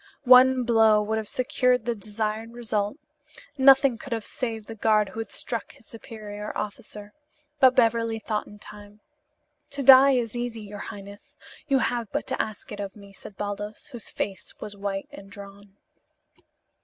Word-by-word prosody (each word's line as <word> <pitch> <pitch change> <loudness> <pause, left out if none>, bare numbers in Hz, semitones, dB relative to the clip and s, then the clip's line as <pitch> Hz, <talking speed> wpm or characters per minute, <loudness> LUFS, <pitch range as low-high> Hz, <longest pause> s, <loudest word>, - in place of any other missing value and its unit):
One 255 0 +7
blow 225 -2 +4
would 220 +1 -1
have 215 - -7
secured 250 -2 +1
the 240 - 0
desired 215 +1 -4
result. 215 -1 -2 0.6
Nothing 270 -3 +5
could 260 - -6
have 225 -2 -4
saved 225 -4 -5
the 225 - -8
guard 215 -2 +2
who 205 - -8
had 225 - -5
struck - - -5
his - - -21
superior 210 -3 -8
officer. 210 0 -7 0.5
But 260 -2 +6
Beverly 230 -2 +2
thought 215 -1 -3
in 210 - -13
time. 210 0 -13 0.7
"To 280 -1 -4
die 270 +1 +8
is 240 -3 -1
easy, 240 -2 -4
your 205 -1 -9
highness. 200 +1 -12 0.3
You 275 -2 +3
have 240 -3 -2
but - - -2
to - - 0
ask 215 -1 -7
it 205 - -7
of 200 -1 -6
me," 200 -1 -14
said 195 0 -13
Baldos, 205 +4 -6
whose 240 -5 -9
face 190 -2 -6
was 205 - -8
white 195 -1 -4
and 195 0 -12
drawn. 200 0 -13
220 Hz, 170 wpm, -25 LUFS, 205-240 Hz, 0.7 s, die